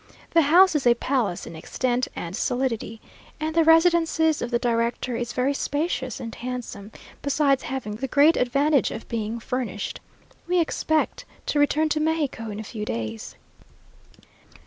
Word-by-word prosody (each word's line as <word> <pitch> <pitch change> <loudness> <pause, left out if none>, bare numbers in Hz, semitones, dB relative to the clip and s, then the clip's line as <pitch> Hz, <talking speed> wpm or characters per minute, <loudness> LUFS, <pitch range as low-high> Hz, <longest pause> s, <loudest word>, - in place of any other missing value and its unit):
The 335 - +5
house 350 +5 +6
is 275 -4 +1
a 240 - +6
palace 235 -7 -1
in - - -9
extent 245 +9 -1
and 170 +2 -5
solidity; 230 -2 -2 0.4
and 310 +1 -2
the 330 0 +4
residence 330 +1 +4 0.2
of 240 - -2
the 240 - +2
director 235 +1 -1
is 240 0 -3
very 260 +3 0
spacious 280 -4 -2
and 230 -2 -6
handsome, 240 -4 -6 0.3
besides 280 -1 +2
having 245 -5 -4
the 270 +4 -3
great 290 +5 +5
advantage 275 +3 +2
of 225 - -7
being 225 0 -3
furnished. 230 -4 -4 0.5
We 360 0 +2
expect 315 -1 0 0.2
to 295 - 0
return 300 +2 +3
to 305 - 0
Mexico 305 -8 -1
in 210 0 -6
a - - -5
few 215 0 -6
days. 110 - -5
255 Hz, 155 wpm, -24 LUFS, 230-305 Hz, 0.5 s, house